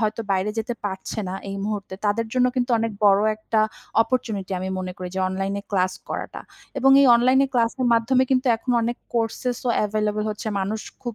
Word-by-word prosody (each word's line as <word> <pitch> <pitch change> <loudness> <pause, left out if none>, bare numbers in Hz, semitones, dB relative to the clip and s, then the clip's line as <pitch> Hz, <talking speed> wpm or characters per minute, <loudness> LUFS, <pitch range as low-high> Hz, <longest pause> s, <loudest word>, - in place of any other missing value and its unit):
হয়তো 215 0 0
বাইরে 190 +2 0
যেতে 235 +2 -2
পারছে 190 +1 -4
না 185 - -4 0.2
এই 195 - -4
মুহূর্তে। 205 -3 -4
তাদের 225 +3 +1
জন্য 250 -1 +3
কিন্তু 250 0 0
অনেক 225 0 -1
বড় 200 -1 +6 0.2
একটা 215 0 0 0.4
অপরচুনিটি 220 -6 -3
আমি 185 +1 -4
মনে 185 0 -4
করি 185 -2 -6
যে - - 0
অনলাইন 195 +1 -2 0.2
ক্লাস 185 -2 +1 0.2
করাটা। - - -5 0.4
এবং 270 0 +4
এই 280 - +6
অনলাইন 255 +3 +4
ক্লাসের 245 +1 +1
মাধ্যমে 240 +3 +3
কিন্তু 260 0 +2
এখন 250 - -5
অনেক 235 +1 -1 0.2
কোর্সেস 235 +1 -1
ও - - +3
অ্যাভেইলেবল 210 0 0
হচ্ছে। 210 +1 -5
মানুষ 210 +3 -2 0.2
খুব 240 -2 -4
220 Hz, 190 wpm, -23 LUFS, 195-240 Hz, 0.4 s, বড়